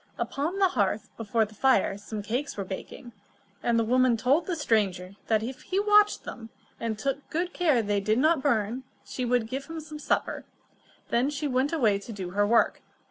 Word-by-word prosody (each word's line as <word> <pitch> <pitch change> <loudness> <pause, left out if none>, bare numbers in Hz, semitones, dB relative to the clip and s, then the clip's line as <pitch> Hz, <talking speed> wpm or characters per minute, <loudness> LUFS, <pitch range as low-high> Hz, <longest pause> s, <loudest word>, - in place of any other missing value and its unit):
Upon 310 +7 -2
the 390 -1 +4
hearth 205 - -1
before 225 0 0
the 215 - -15
fire, 215 -4 +3
some 205 +1 -6
cakes 245 +7 -3
were 200 - -2
baking, 195 +5 -8 0.5
and 235 -1 +1
the 230 - +3
woman 250 +1 +3
told 270 +9 +2
the 360 - -1
stranger 200 - 0
that 220 -1 +2
if 255 +3 -6
he 375 - -1
watched 415 0 +4
them, 225 -2 -8 0.3
and 225 -2 -2
took 275 +5 -3 0.2
care 300 -10 +2
that - - -7
they 205 -1 +2
did 215 +2 +1
not 310 +2 +3
burn, 235 -2 0 0.2
she 255 - -4
would 245 -1 +2
give 270 +4 -4
him 325 +2 -6
some 305 -1 -9
supper. - - -1 0.7
Then 245 +4 +2
she 295 0 -2
went 260 +1 +1
away 225 -11 +2
to 200 - -9
do 190 -4 -6
her 205 +2 +2
work. 230 +2 +3
240 Hz, 195 wpm, -27 LUFS, 215-285 Hz, 0.7 s, the